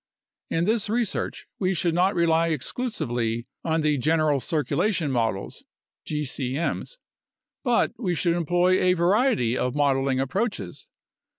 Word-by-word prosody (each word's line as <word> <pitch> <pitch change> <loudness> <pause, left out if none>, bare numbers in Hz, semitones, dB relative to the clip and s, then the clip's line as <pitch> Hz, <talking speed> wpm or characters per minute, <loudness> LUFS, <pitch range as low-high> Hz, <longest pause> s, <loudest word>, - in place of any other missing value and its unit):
In 165 - 0
this 215 0 +1
research, 230 -2 -2
we 190 -1 +1
should 170 0 +1
not 185 +4 +2
rely 165 -1 +3
exclusively 120 - -2 0.2
on 160 -1 +1
the 150 -2 +1
general 155 0 +2
circulation 155 - 0
models 115 -6 -2 0.4
(gcm's) 150 - -3 0.7
but 245 -3 +2 0.2
should 170 +1 +1
employ 175 +2 +2
a. 180 0 +4
variety 180 - +2
of 125 0 -1
modeling 135 -2 +2
approaches. 135 - -3
165 Hz, 115 wpm, -25 LUFS, 135-185 Hz, 0.7 s, a